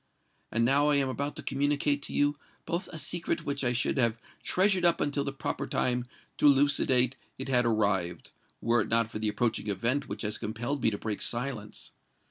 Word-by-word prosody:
And 115 Hz, +1 st, +2 dB
now 140 Hz, +4 st, +4 dB
I 150 Hz, -, +4 dB
am 140 Hz, -2 st, +2 dB
about 140 Hz, +3 st, -3 dB
to -, -, -6 dB
communicate 145 Hz, +1 st, +1 dB
to -, -, -6 dB
you 145 Hz, 0 st, +2 dB, 0.3 s
both 170 Hz, +2 st, -2 dB
a 160 Hz, -, -8 dB
secret 170 Hz, +3 st, -3 dB
which 140 Hz, -1 st, -2 dB
I 120 Hz, -, +2 dB
should 120 Hz, +3 st, 0 dB
have 115 Hz, -2 st, +2 dB, 0.2 s
treasured 190 Hz, -1 st, +2 dB
up 170 Hz, -1 st, +4 dB
until 145 Hz, -1 st, 0 dB
the 140 Hz, -, -3 dB
proper 135 Hz, -, -4 dB
time 125 Hz, -1 st, 0 dB, 0.3 s
to -, -, +5 dB
elucidate 135 Hz, -2 st, +4 dB, 0.2 s
it 135 Hz, +1 st, -5 dB
had 125 Hz, -2 st, +4 dB
arrived—were 105 Hz, +2 st, -1 dB
it -, -, -2 dB
not 115 Hz, 0 st, +2 dB
for -, -, -5 dB
the 110 Hz, -1 st, 0 dB
approaching 110 Hz, 0 st, -1 dB
event 120 Hz, +8 st, 0 dB
which -, -, -4 dB
has 105 Hz, 0 st, -2 dB
compelled 120 Hz, +6 st, -3 dB
me 115 Hz, -, +4 dB
to 105 Hz, -, -4 dB
break 105 Hz, -1 st, -4 dB
silence. 120 Hz, -3 st, -4 dB
130 Hz, 195 wpm, -29 LUFS, 115-145 Hz, 0.3 s, to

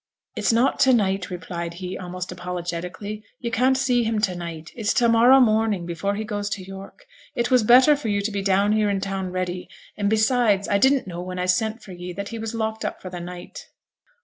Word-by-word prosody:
'It's -, -, +1 dB
not 235 Hz, +4 st, +2 dB
to 265 Hz, -1 st, +5 dB
night,' 195 Hz, -4 st, +1 dB
replied 170 Hz, -1 st, -5 dB
he, 180 Hz, +1 st, -6 dB
almost 180 Hz, 0 st, -6 dB
apologetically. 180 Hz, +3 st, -5 dB, 0.2 s
'You 235 Hz, -2 st, -4 dB
can't 255 Hz, +3 st, +3 dB
see 250 Hz, -2 st, +2 dB
him 225 Hz, -1 st, -1 dB
to 195 Hz, -4 st, +1 dB
night; 170 Hz, -2 st, -7 dB
it's 220 Hz, -3 st, -1 dB
to 240 Hz, -, +4 dB
morrow 235 Hz, +3 st, +6 dB
morning 215 Hz, -6 st, +2 dB
before 185 Hz, +4 st, -2 dB
he 215 Hz, -, -3 dB
goes 205 Hz, -2 st, -3 dB
to 195 Hz, -, -4 dB
York; 195 Hz, -, -11 dB, 0.3 s
it 240 Hz, +1 st, -1 dB
was 250 Hz, -1 st, +5 dB
better 255 Hz, +7 st, +6 dB
for 285 Hz, -5 st, -5 dB
yo' 205 Hz, -1 st, +1 dB
to 210 Hz, +2 st, -2 dB
be 200 Hz, -1 st, -2 dB
down 195 Hz, +1 st, +2 dB
here 215 Hz, -1 st, +2 dB
in 200 Hz, -1 st, 0 dB
town 190 Hz, -1 st, -3 dB
ready; 180 Hz, 0 st, -3 dB, 0.3 s
and 200 Hz, -1 st, 0 dB
beside 220 Hz, -2 st, +2 dB
I 200 Hz, -, +2 dB
didn't 265 Hz, +3 st, +3 dB
know 175 Hz, -2 st, -6 dB
when 180 Hz, 0 st, -6 dB
I 180 Hz, -, -1 dB
sent 220 Hz, +5 st, 0 dB
for 195 Hz, -, -11 dB
ye 180 Hz, 0 st, -7 dB
that 200 Hz, +2 st, -5 dB
he 230 Hz, -, -6 dB
was 225 Hz, +1 st, -4 dB
locked 220 Hz, 0 st, -2 dB
up -, -, -4 dB
for 185 Hz, -, -9 dB
the 180 Hz, -, -6 dB
night.' 175 Hz, 0 st, -9 dB
200 Hz, 225 wpm, -23 LUFS, 180-225 Hz, 0.3 s, morrow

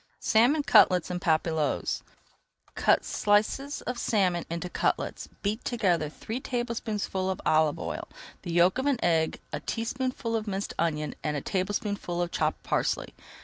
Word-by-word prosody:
SALMON 250 Hz, +7 st, +3 dB
CUTLETS 180 Hz, -, +5 dB
EN 180 Hz, -, -2 dB
PAPILLOTES 160 Hz, -3 st, 0 dB, 0.7 s
Cut -, -, +3 dB
slices 215 Hz, +8 st, +1 dB
of 250 Hz, -1 st, -4 dB
salmon 185 Hz, -7 st, +1 dB
into 170 Hz, +1 st, -3 dB
cutlets. -, -, -1 dB
Beat 210 Hz, +3 st, -1 dB
together 180 Hz, -10 st, +1 dB
three 220 Hz, -, -5 dB
tablespoonfuls 230 Hz, -7 st, -2 dB
of 190 Hz, -, -2 dB
olive 155 Hz, -1 st, +3 dB
oil, -, -, -5 dB, 0.3 s
the 175 Hz, -, -5 dB
yolk 175 Hz, +6 st, +4 dB
of 265 Hz, -, 0 dB
an 280 Hz, -3 st, +3 dB
egg, 160 Hz, -2 st, +2 dB
a -, -, -1 dB
teaspoonful 230 Hz, 0 st, -2 dB
of 220 Hz, -1 st, -2 dB
minced 195 Hz, 0 st, -3 dB
onion 155 Hz, -2 st, 0 dB
and 150 Hz, -1 st, -1 dB
a -, -, -3 dB
tablespoonful 195 Hz, -1 st, -2 dB
of 175 Hz, -1 st, -1 dB
chopped 155 Hz, 0 st, -1 dB
parsley. -, -, -1 dB
190 Hz, 145 wpm, -28 LUFS, 170-230 Hz, 0.7 s, CUTLETS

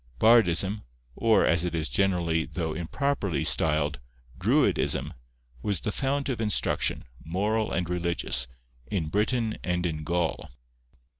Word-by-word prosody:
Bardism, 105 Hz, -3 st, +4 dB, 0.3 s
or 115 Hz, -1 st, +3 dB
as 85 Hz, +1 st, +3 dB
it 90 Hz, -1 st, -2 dB
is 80 Hz, -2 st, 0 dB
generally 85 Hz, +2 st, +1 dB
though 80 Hz, +2 st, -3 dB
improperly 90 Hz, -, -1 dB
styled, 75 Hz, -1 st, +2 dB, 0.4 s
druidism, -, -, +2 dB, 0.5 s
was 100 Hz, +1 st, -1 dB
the 105 Hz, -, -2 dB
fount 140 Hz, +4 st, -1 dB
of 125 Hz, -4 st, -2 dB
instruction, 105 Hz, -2 st, 0 dB, 0.2 s
moral 105 Hz, +6 st, -1 dB
and 90 Hz, -2 st, -1 dB
religious, 85 Hz, -7 st, -1 dB, 0.4 s
in 80 Hz, -1 st, -2 dB
Britain 110 Hz, +3 st, 0 dB
and 90 Hz, 0 st, -1 dB
in 80 Hz, -3 st, -2 dB
Gaul. 85 Hz, 0 st, -1 dB
90 Hz, 125 wpm, -27 LUFS, 80-110 Hz, 0.5 s, Bardism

